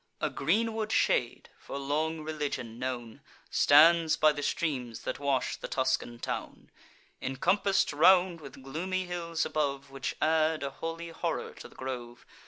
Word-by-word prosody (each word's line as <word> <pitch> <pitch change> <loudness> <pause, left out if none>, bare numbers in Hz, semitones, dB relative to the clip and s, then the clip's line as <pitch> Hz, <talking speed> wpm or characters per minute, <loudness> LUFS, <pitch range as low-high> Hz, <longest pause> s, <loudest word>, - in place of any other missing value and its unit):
A - - -1
greenwood 220 +7 0
shade, 120 - +1
for - - -7
long 155 +3 -1
religion 145 -7 -4
known, 125 -3 -5 0.3
Stands 160 +2 +6
by 155 0 +5
the 145 -1 -5
streams 130 -7 -2
that - - -4
wash 140 -3 0
the - - -6
Tuscan 130 -2 -1
town, - - -6 0.5
Incompass'd 190 +9 +1
round 175 +2 +5
with 135 -2 -11
gloomy 185 +7 -3
hills 170 -2 -2
above, 140 -2 -2
Which 135 -1 -4
add 155 -1 +2
a 140 - -3
holy 165 +3 -5
horror 165 - -3
to - - -11
the - - -20
grove. 120 -2 -6
150 Hz, 145 wpm, -30 LUFS, 135-165 Hz, 0.5 s, Stands